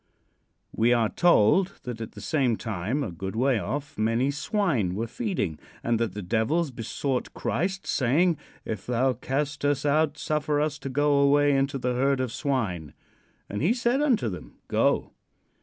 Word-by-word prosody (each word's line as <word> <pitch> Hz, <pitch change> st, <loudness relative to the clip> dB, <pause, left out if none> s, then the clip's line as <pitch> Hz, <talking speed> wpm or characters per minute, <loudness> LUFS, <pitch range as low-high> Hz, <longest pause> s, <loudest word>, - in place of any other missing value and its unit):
We 120 Hz, +2 st, +4 dB
are 115 Hz, -3 st, +2 dB
told 175 Hz, -, +4 dB
that 120 Hz, -2 st, -6 dB
at 115 Hz, -, -6 dB
the -, -, -10 dB
same 130 Hz, -8 st, +1 dB
time, 110 Hz, +6 st, -2 dB
a 105 Hz, -, -4 dB
good 95 Hz, +4 st, -6 dB
way 125 Hz, 0 st, +2 dB
off, 145 Hz, +1 st, -4 dB
many 115 Hz, +5 st, +2 dB
swine 145 Hz, -, 0 dB
were 110 Hz, +3 st, -1 dB
feeding, 165 Hz, -, -3 dB, 0.2 s
and 115 Hz, -1 st, +1 dB
that 115 Hz, -5 st, -1 dB
the 105 Hz, -, -5 dB
devils 130 Hz, -, 0 dB
besought 125 Hz, +2 st, -3 dB
Christ, 190 Hz, +4 st, -2 dB
saying: 155 Hz, +7 st, +2 dB, 0.3 s
"If 110 Hz, -4 st, -5 dB
thou 125 Hz, +2 st, +2 dB
cast 140 Hz, +3 st, -3 dB
us 145 Hz, 0 st, +1 dB
out, 150 Hz, +1 st, +2 dB
suffer 150 Hz, -1 st, 0 dB
us 150 Hz, 0 st, -1 dB
to 135 Hz, -, -5 dB
go 145 Hz, +1 st, +2 dB
away 145 Hz, 0 st, +4 dB
into 135 Hz, +1 st, +1 dB
the 125 Hz, -1 st, -1 dB
herd 135 Hz, +2 st, +1 dB
of 130 Hz, -3 st, -1 dB
swine." 110 Hz, -, -2 dB, 0.5 s
And 105 Hz, -, -4 dB
he 190 Hz, -, +3 dB
said 245 Hz, +3 st, +1 dB
unto 255 Hz, -, +2 dB
them: 90 Hz, -4 st, -7 dB
"Go." -, -, +1 dB
135 Hz, 170 wpm, -26 LUFS, 115-150 Hz, 0.5 s, We